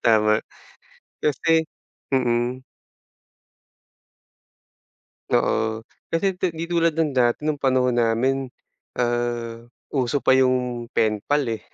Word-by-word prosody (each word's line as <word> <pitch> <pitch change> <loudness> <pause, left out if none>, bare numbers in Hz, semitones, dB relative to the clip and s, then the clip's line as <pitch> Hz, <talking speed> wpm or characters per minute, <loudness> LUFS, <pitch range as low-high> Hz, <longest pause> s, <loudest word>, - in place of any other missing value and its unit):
Tama, 110 -1 +4 0.8
kasi 160 +2 +2 0.4
Mm. 125 -1 0 2.7
Oo, 110 0 +1 0.2
kasi 180 +2 -1
ti 180 -3 -1
di 165 +1 -5
tulad 170 -2 +2
ng 160 -2 +1
dati 125 +1 +1
nung 150 -1 -1
panahon 130 -2 +2
namin 125 +4 +1 0.5
ah, 120 -1 -1 0.3
uso 135 0 0
pa - - +3
yung 125 -2 +1
pen 110 -1 +2
pal 145 0 +2
eh, 110 -1 -5
125 Hz, 100 wpm, -23 LUFS, 120-150 Hz, 2.7 s, Tama